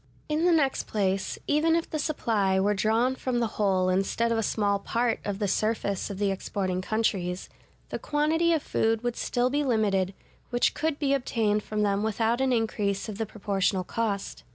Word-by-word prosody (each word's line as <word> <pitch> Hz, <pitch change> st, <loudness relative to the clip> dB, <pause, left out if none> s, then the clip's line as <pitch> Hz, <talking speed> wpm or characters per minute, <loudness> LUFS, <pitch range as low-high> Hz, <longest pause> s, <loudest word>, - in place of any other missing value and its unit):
In 310 Hz, +2 st, 0 dB
the 355 Hz, -, +5 dB
next 290 Hz, -5 st, +2 dB
place, 195 Hz, -2 st, -1 dB
even 315 Hz, +2 st, +3 dB
if 335 Hz, -, 0 dB
the 310 Hz, -, -3 dB
supply 215 Hz, -11 st, +1 dB
were 205 Hz, +2 st, +2 dB
drawn 220 Hz, +5 st, +2 dB
from 255 Hz, -2 st, -1 dB
the 235 Hz, -, +2 dB, 0.2 s
whole 190 Hz, -2 st, +2 dB
instead 195 Hz, +5 st, +1 dB
of 230 Hz, -, +1 dB
a -, -, +2 dB
small 205 Hz, -2 st, +1 dB
part 235 Hz, +3 st, 0 dB
of 200 Hz, -1 st, -3 dB
the 205 Hz, -1 st, -1 dB
surface 215 Hz, -1 st, -1 dB
of 200 Hz, -, -5 dB
the 200 Hz, 0 st, +1 dB
exporting 190 Hz, -1 st, -2 dB
countries, 185 Hz, -4 st, -1 dB, 0.4 s
the -, -, -4 dB
quantity 315 Hz, +3 st, +1 dB
of 320 Hz, -3 st, +1 dB
food 225 Hz, +1 st, 0 dB
would 240 Hz, -1 st, -1 dB
still 245 Hz, +1 st, 0 dB
be 290 Hz, +1 st, +1 dB
limited, 200 Hz, -7 st, +1 dB, 0.3 s
which 245 Hz, -1 st, +2 dB
could 315 Hz, -2 st, -1 dB
be 280 Hz, -2 st, +1 dB
obtained 225 Hz, -6 st, +1 dB
from 210 Hz, 0 st, -2 dB
them 200 Hz, -1 st, +1 dB
without 225 Hz, +3 st, 0 dB
an 265 Hz, -1 st, +2 dB
increase 215 Hz, -4 st, 0 dB
of 210 Hz, 0 st, -6 dB
the 225 Hz, -, -1 dB
proportional 195 Hz, -2 st, 0 dB
cost. 205 Hz, 0 st, -3 dB
220 Hz, 190 wpm, -27 LUFS, 200-255 Hz, 0.4 s, the